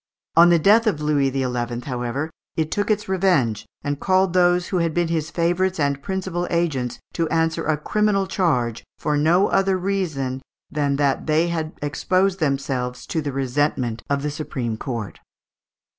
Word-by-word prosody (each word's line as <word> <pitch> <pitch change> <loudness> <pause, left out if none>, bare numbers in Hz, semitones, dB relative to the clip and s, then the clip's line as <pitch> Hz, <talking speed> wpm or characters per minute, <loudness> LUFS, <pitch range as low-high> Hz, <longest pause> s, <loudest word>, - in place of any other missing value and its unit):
On 170 +1 +8
the 170 - +6
death 215 +8 +4
of 165 -8 +1
Louis 150 -2 +2
XI., 125 -2 -2
however, 130 +4 -3 0.3
it 160 -1 0
took 205 +1 -1
its 210 -1 0
revenge, 175 - +1 0.2
and 145 -1 -2
called 185 -1 +2
those 180 -1 +3
who 185 - 0
had 165 -2 0
been 175 -1 +1
his 160 -2 -1
favourites 175 +2 0
and 140 -1 0
principal 185 -1 -3
agents 150 -8 -1 0.2
to 165 -2 -1
answer 165 0 0
a 155 -1 +2
criminal 205 +4 +1
charge, 125 - 0
for 150 -1 -1
no 165 +7 +3
other 195 -1 +2
reason 160 -9 -2 0.3
than 145 -2 0
that 140 0 0
they 160 +3 +2
had 160 -2 -3
exposed 185 +6 +1
themselves 135 -4 -1
to 160 - -2
the 145 -1 -3
resentment 130 -3 -1
of 140 0 0
the 150 - -1
supreme 130 -6 -3
court. 115 -3 -5
155 Hz, 165 wpm, -22 LUFS, 135-180 Hz, 0.3 s, On